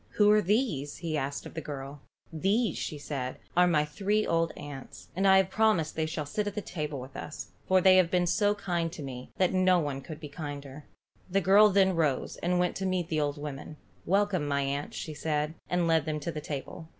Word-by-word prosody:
"Who 210 Hz, -1 st, +5 dB
are 210 Hz, 0 st, +5 dB
these?" 185 Hz, -, 0 dB
he 165 Hz, -2 st, -3 dB
asked 140 Hz, -1 st, -3 dB
of -, -, -9 dB
the 160 Hz, -, -4 dB
girl. 140 Hz, -1 st, -7 dB, 0.3 s
"These," 200 Hz, +8 st, +1 dB, 0.2 s
said 130 Hz, -4 st, -3 dB
she, -, -, -27 dB
"are 180 Hz, +1 st, +5 dB
my 150 Hz, -4 st, +3 dB
three 200 Hz, +8 st, 0 dB
old 165 Hz, 0 st, +1 dB
aunts, 140 Hz, -2 st, -9 dB
and 195 Hz, +2 st, +2 dB
I 190 Hz, 0 st, +7 dB
have 190 Hz, -1 st, +2 dB
promised 215 Hz, -8 st, +2 dB
they 160 Hz, 0 st, 0 dB
shall 155 Hz, -1 st, -3 dB
sit 205 Hz, +9 st, -2 dB
at 205 Hz, -, -4 dB
the -, -, -1 dB
table 150 Hz, -7 st, -4 dB
with 130 Hz, +2 st, -10 dB
us, 150 Hz, -, -7 dB, 0.2 s
for 185 Hz, 0 st, +4 dB
they 185 Hz, 0 st, +7 dB
have 180 Hz, -2 st, +4 dB
been 180 Hz, 0 st, +2 dB
so 205 Hz, +4 st, +2 dB
kind 175 Hz, -4 st, -2 dB
to 155 Hz, -, -7 dB
me 130 Hz, -2 st, -7 dB
that 185 Hz, -1 st, +2 dB
no 185 Hz, -1 st, +4 dB
one 145 Hz, -5 st, -2 dB
could 155 Hz, +3 st, -9 dB
be 155 Hz, -, -7 dB
kinder." 145 Hz, -1 st, -7 dB, 0.4 s
The 195 Hz, +2 st, +2 dB
girl 205 Hz, +3 st, +6 dB
then 190 Hz, -2 st, +3 dB
rose, 150 Hz, -5 st, 0 dB
and 180 Hz, +1 st, 0 dB
went 180 Hz, 0 st, +1 dB
to 190 Hz, -, -3 dB
meet 180 Hz, -2 st, -1 dB
the 155 Hz, -1 st, 0 dB
old 145 Hz, 0 st, -1 dB
women. 145 Hz, +1 st, -7 dB, 0.3 s
"Welcome, 195 Hz, -4 st, +2 dB
my 140 Hz, 0 st, +1 dB
aunts," 140 Hz, +1 st, -3 dB
she 155 Hz, -, -5 dB
said, 150 Hz, 0 st, -1 dB, 0.2 s
and 180 Hz, -1 st, +1 dB
led 160 Hz, -2 st, +2 dB
them 155 Hz, -1 st, -1 dB
to 170 Hz, -, -3 dB
the 155 Hz, -, -5 dB
table. 150 Hz, +3 st, -6 dB
165 Hz, 225 wpm, -29 LUFS, 145-190 Hz, 0.4 s, I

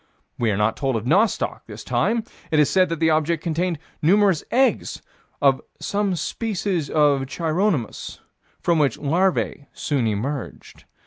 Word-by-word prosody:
We 115 Hz, -, +2 dB
are 100 Hz, -, 0 dB
not 105 Hz, +1 st, +1 dB
told 135 Hz, -3 st, -1 dB
of 110 Hz, 0 st, -3 dB
nostoc, 195 Hz, -, +1 dB
this -, -, -9 dB
time: 230 Hz, 0 st, 0 dB, 0.3 s
it 155 Hz, -, +1 dB
is 150 Hz, -2 st, +4 dB
said 185 Hz, -2 st, +3 dB
that 165 Hz, -2 st, -3 dB
the 160 Hz, -1 st, +3 dB
object 155 Hz, +1 st, +1 dB
contained 170 Hz, +1 st, -1 dB, 0.2 s
numerous 190 Hz, 0 st, +3 dB
eggs 260 Hz, +1 st, +1 dB, 0.4 s
of 135 Hz, -2 st, +4 dB, 0.2 s
"some 200 Hz, -2 st, -1 dB
species 180 Hz, -1 st, -2 dB
of 145 Hz, -3 st, +2 dB
Chironomus, 165 Hz, -, -1 dB, 0.4 s
from 170 Hz, -2 st, +1 dB
which 145 Hz, -3 st, +2 dB
larvae 160 Hz, -1 st, 0 dB
soon 135 Hz, -6 st, -1 dB
emerged." 120 Hz, +6 st, -5 dB
155 Hz, 145 wpm, -22 LUFS, 140-185 Hz, 0.4 s, is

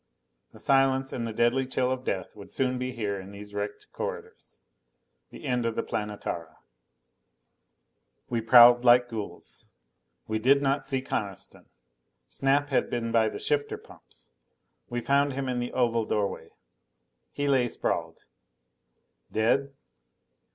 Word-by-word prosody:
The -, -, -15 dB
silence 135 Hz, -1 st, +2 dB
and 115 Hz, -2 st, -3 dB
the -, -, -4 dB
deadly 120 Hz, +4 st, +1 dB
chill 130 Hz, -1 st, 0 dB
of 130 Hz, 0 st, -3 dB
death 95 Hz, -7 st, -3 dB
would 100 Hz, -2 st, -12 dB
soon 130 Hz, -1 st, 0 dB
be 125 Hz, 0 st, -2 dB
here 105 Hz, -5 st, -3 dB
in 95 Hz, +1 st, -10 dB
these 105 Hz, 0 st, -10 dB
wrecked 105 Hz, 0 st, -4 dB
corridors. -, -, -7 dB, 0.7 s
The -, -, -11 dB
end 125 Hz, -1 st, 0 dB
of 115 Hz, -1 st, -1 dB
the -, -, -1 dB
Planetara. 85 Hz, -6 st, -5 dB, 1.7 s
We 120 Hz, -1 st, -1 dB
prowled 120 Hz, +1 st, +8 dB
like 120 Hz, 0 st, +6 dB
ghouls. 110 Hz, -3 st, -7 dB, 0.6 s
We 110 Hz, 0 st, -2 dB
did 135 Hz, +5 st, +4 dB
not 140 Hz, 0 st, 0 dB
see 135 Hz, -2 st, -1 dB
Coniston. 100 Hz, -7 st, -5 dB, 0.6 s
Snap 140 Hz, +1 st, +1 dB
had 135 Hz, -, +1 dB
been 115 Hz, -1 st, -2 dB
by 115 Hz, -1 st, +3 dB
the -, -, -6 dB
shifter 145 Hz, -1 st, -1 dB
pumps. -, -, -15 dB, 0.6 s
We 120 Hz, 0 st, -2 dB
found 140 Hz, +3 st, +2 dB
him 135 Hz, 0 st, -3 dB
in 125 Hz, -1 st, -1 dB
the 120 Hz, 0 st, -3 dB
oval 115 Hz, -3 st, +1 dB
doorway. 100 Hz, -2 st, -2 dB, 0.8 s
He 145 Hz, 0 st, -2 dB
lay 130 Hz, -3 st, +3 dB
sprawled. -, -, -3 dB, 1.1 s
Dead? 135 Hz, +5 st, +1 dB
120 Hz, 140 wpm, -27 LUFS, 110-135 Hz, 1.7 s, prowled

